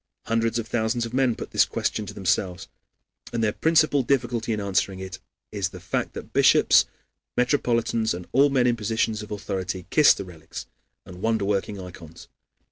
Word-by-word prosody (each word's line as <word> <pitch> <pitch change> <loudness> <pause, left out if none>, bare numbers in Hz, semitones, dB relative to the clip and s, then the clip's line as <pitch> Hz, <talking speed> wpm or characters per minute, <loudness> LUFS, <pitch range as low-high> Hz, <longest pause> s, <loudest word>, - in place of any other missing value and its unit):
Hundreds 115 0 0
of 115 -1 -3
thousands 115 +1 0
of 115 - -8
men 130 -3 +2
put - - -8
this - - +5
question 105 - -2
to - - -7
themselves, 95 -1 -1 0.6
and 115 -1 -1
their 105 -1 +1
principal 155 -3 +3
difficulty 120 -3 0
in 110 - -1
answering 100 -1 0
it 95 -1 -7 0.3
is 100 -3 -2
the 90 - -10
fact - - -3
that - - -9
bishops, - - +5 0.5
metropolitans, 115 -5 +1
and 90 0 -8
all 140 +3 +5
men 130 -3 +2
in 120 -1 +3
positions 110 0 -1
of 105 - -9
authority 95 -3 -4
kiss 155 -2 +6
the - - -6
relics 80 -3 -9 0.4
and 90 0 -11
wonder 110 -2 +1
working 100 0 -1
ikons. 85 -3 -11
110 Hz, 175 wpm, -25 LUFS, 95-120 Hz, 0.6 s, kiss